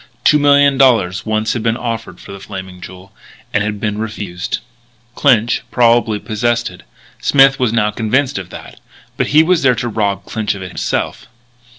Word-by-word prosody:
Two 150 - +5
million 140 -1 +4
dollars 105 -8 +3
once 110 +1 0
had 120 - -3
been 115 +1 0
offered 115 -6 -5
for - - -12
the 100 - -9
Flaming 95 -2 -9
Jewel; 95 +1 -12 0.4
and 105 - +2
had 105 -1 -3
been 105 0 -2
refused. 105 -5 -4 0.6
Clinch 120 -4 +2
probably 115 -3 +3
possessed 120 +2 -1
it. 90 - -14 0.4
Smith 135 0 +4
was 125 -4 +1
now 105 -2 +1
convinced 130 +5 0
of 90 -2 -9
that. - - -11 0.4
But - - -1
he 155 +2 +5
was 175 0 +2
there 125 -2 +3
to 120 +1 -3
rob 100 -4 -2
Clinch 110 -2 -2
of 95 - -7
it 90 - -7
himself. - - -3
110 Hz, 180 wpm, -16 LUFS, 100-125 Hz, 0.6 s, Two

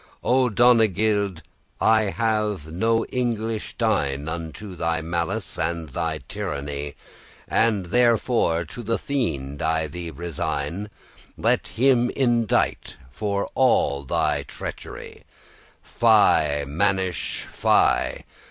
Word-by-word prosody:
O 130 0 +3
Donegild, 105 -5 +3 0.4
I 110 -1 +4
have 105 -6 -1
no 115 +6 +1
English 115 -3 -2
dign* 75 - +1
*worthy 80 - -3
Unto 85 +4 -6
thy 80 -1 0
malice, 85 +3 -3
and 80 -1 -2
thy 80 +3 -3
tyranny: 75 -7 -4 0.5
And 110 -5 +2
therefore 115 -5 +2
to 95 +9 -8
the 115 0 -1
fiend 70 - -3
I 80 0 +1
thee 85 +3 -6
resign, 85 +3 -4 0.5
Let - - +1
him 125 0 +3
indite 120 -4 +1 0.2
of 100 -1 0
all 115 - +2
thy 70 - 0
treachery - - -8 0.6
'Fy, 70 0 +3
mannish,* 95 +3 -1
fy! - - +2
100 Hz, 105 wpm, -24 LUFS, 80-115 Hz, 0.6 s, I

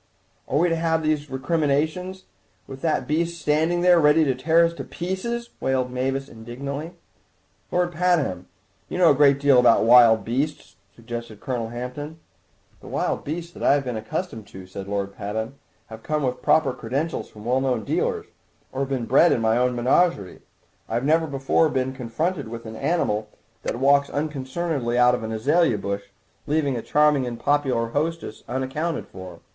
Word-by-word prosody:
"Are 135 - 0
we 170 +4 +4
to 165 - +1
have 165 0 0
all - - -5
these 150 -1 0
recriminations 155 +6 -1 0.4
with 135 0 -10
that 160 -2 0
beast 170 +2 -1
standing 160 +4 +1
there 180 -1 +5
ready 150 +1 +5
to 135 -3 +2
tear 160 +6 +3
us 165 - -1
to - - -7
pieces?" 235 +7 -4
wailed 130 -1 0
Mavis 135 +2 -2
indignantly. 140 +8 -7 0.8
"Lord 175 0 +1
Pabham, 160 - 0 0.4
you - - -4
know 175 -3 +6
a - - +5
good 140 0 +5
deal 140 -2 +5
about 120 -3 +5
wild 115 -1 +6
beasts—" 140 +6 -3 0.2
suggested 115 -2 -7
Colonel 120 -5 -3
Hampton. 125 +7 -6 0.6
"The - - -14
wild - - -2
beasts 170 +3 -5
that - - -12
I - - +4
have 140 - 0
been 125 -3 -4
accustomed 110 0 -5
to," 95 -1 -11
said 95 +1 -8
Lord 100 -1 -3
Pabham, 110 +6 -5 0.3
"have 110 0 -11
come 150 +2 -2
with 125 -1 -2
proper 140 -5 +3
credentials 140 +9 -3
from 105 0 -13
well 125 +2 +1
known 125 -4 0
dealers, - - -1 0.5
or 130 - -5
have 135 0 -1
been 130 -4 -2
bred 140 +8 +5
in - - +2
my 110 0 +2
own 125 +1 +1
menagerie. 125 - +1 0.5
I've 120 +3 -1
never 160 +2 +3
before 140 +3 +1
been 130 -1 -1
confronted 135 +4 -3
with 115 +1 -8
an 110 0 -7
animal 110 -7 -1 0.3
that - - -3
walks 140 +3 +3
unconcernedly 145 -3 -2
out 125 0 +5
of 125 - -1
an 110 0 -5
azalea 140 +3 +2
bush, 100 0 -4 0.4
leaving 145 -3 +1
a 115 - -3
charming 150 -2 +2
and 120 -1 -5
popular 135 -6 +1
hostess 155 -2 -3
unaccounted 140 +6 -2
for. 95 -2 -11
135 Hz, 175 wpm, -23 LUFS, 120-160 Hz, 0.8 s, know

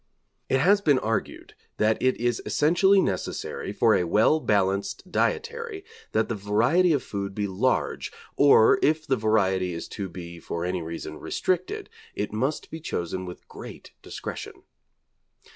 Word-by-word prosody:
It 135 - +3
has 200 +7 +4
been 145 -8 +4
argued 115 -3 -3 0.2
that 110 +1 +2
it 130 0 +2
is 120 -1 0
essentially 190 +6 +4
necessary 95 - -3
for - - +3
a - - +3
well 110 - +4
balanced 100 - 0
dietary 465 -4 -2 0.3
that - - +1
the - - -2
variety 115 - +2
of 145 -5 +1
food 100 -1 -5
be 105 - -1
large, 100 +7 -1 0.2
or 140 -6 +6
if 155 +1 +2
the 135 -3 +2
variety 95 -5 +1
is 85 - -6
to 100 -2 -5
be 85 -1 -9
for 85 +1 -4
any 90 0 -2
reason 85 +1 -6
restricted, 185 -1 -2 0.3
it 105 +1 -3
must 130 +8 -2
be 160 - -6
chosen 95 - -4
with 90 - -10
great - - -11
discretion. - - -7
110 Hz, 150 wpm, -26 LUFS, 95-155 Hz, 0.3 s, or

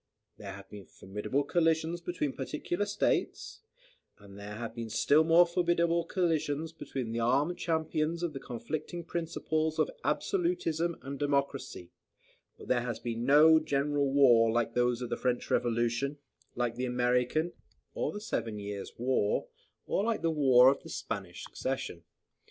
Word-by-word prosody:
There - - -8
have 100 0 -11
been 100 -2 -11
formidable 105 +8 -3
collisions 165 +2 +1
between 165 -5 -2
particular 175 +8 -3
states; 205 0 -1 0.6
and 100 -1 -15
there 100 +1 -8
have 115 +1 -5
been 115 -1 -6
still 145 +7 +4
more 165 +2 +6
formidable 170 -1 +1
collisions 160 -4 -1
between 130 -7 -5
the 115 - -2
armed 140 +9 +1
champions 160 0 -1
of 170 -3 -2
the 135 - -5
conflicting 155 +8 -5
principles 160 -2 -2
of - - +1
absolutism 335 - 0
and 140 +1 -6
democracy; 140 -9 -2 0.7
but - - -12
there 125 -1 +2
has 120 -2 -3
been 120 0 -3
no 155 +4 +7
general 145 -2 0
war, 120 -5 +5
like 115 0 0
those 125 0 +1
of 120 - -6
the - - -1
French 125 -1 -1
Revolution, 120 +4 0 0.4
like 120 -1 -1
the 125 +2 -3
American, 125 +6 +1 0.4
or - - -2
the 210 - -6
Seven 115 - -3
Years' 100 -1 -6
War, 120 -4 0 0.4
or 195 - 0
like 225 -4 -1
the 165 - +2
War 130 -4 +6
of 140 - -4
the - - -12
Spanish - - -5
Succession. 130 -10 -4
140 Hz, 150 wpm, -30 LUFS, 120-165 Hz, 0.7 s, no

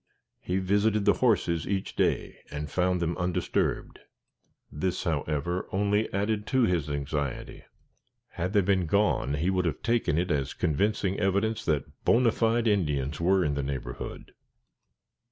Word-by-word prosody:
He 90 - -2
visited 100 +2 +1
the - - +6
horses 95 -9 +2
each 95 -1 -2
day, - - 0
and 75 +1 -5
found 90 0 +1
them 85 0 -1
undisturbed. 90 0 -1 0.7
This, 90 +5 -2
however, 80 +2 -1
only 105 +2 +1
added 105 +2 -1
to 130 -1 +2
his 85 -8 +1
anxiety. 70 -1 -4 0.6
Had 90 +3 -3
they 105 - +5
been 95 -2 +1
gone 100 -7 +1
he 85 +6 0
would 90 -1 0
have 80 -4 -2
taken 115 -10 +1
it 90 +1 0
as 70 -1 -1
convincing 95 +4 0
evidence 105 +3 0
that 75 -4 -2
bona 120 0 +4
fide 115 +1 +1
Indians 75 -7 0
were 95 +1 +3
in 75 - 0
the 70 - -1
neighborhood. 65 -3 -6
90 Hz, 145 wpm, -28 LUFS, 75-105 Hz, 0.7 s, the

